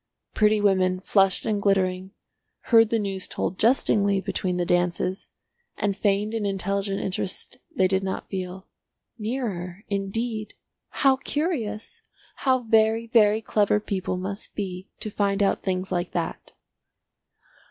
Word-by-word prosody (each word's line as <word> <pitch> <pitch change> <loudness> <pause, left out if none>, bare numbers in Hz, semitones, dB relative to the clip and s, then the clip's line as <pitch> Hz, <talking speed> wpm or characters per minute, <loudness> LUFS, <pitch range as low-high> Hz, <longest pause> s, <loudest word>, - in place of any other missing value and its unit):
Pretty 215 0 +3
women, 185 -2 +2
flushed 195 -1 +2
and 210 -2 0
glittering, 190 -1 +1 0.6
heard 225 -2 +7
the 230 - +2
news 195 -3 -3
told 185 - -3
jestingly 205 -4 +3
between 185 -1 -2
the 175 - 0
dances, 180 +2 0 0.5
and 200 -1 0
feigned 205 +1 +1
an 225 -2 -1
intelligent 195 0 -1
interest 190 0 -4 0.2
they 190 - +4
did 190 +1 +1
not 190 0 -3
feel. 185 0 -5 0.5
"Nearer! 210 -6 -4
Indeed. 215 +2 -3 0.3
How 270 -2 +3
curious! 265 - -3 0.4
How 260 -2 +2
very, 225 0 +3
very 220 -2 +4
clever 210 -1 +2
people 190 -3 -3
must 195 +3 -4
be 190 -2 -5
to 215 - -3
find 200 0 +1
out 195 - +1
things 185 0 -2
like 175 0 -2
that!" 170 -2 -4
200 Hz, 130 wpm, -25 LUFS, 190-215 Hz, 0.6 s, heard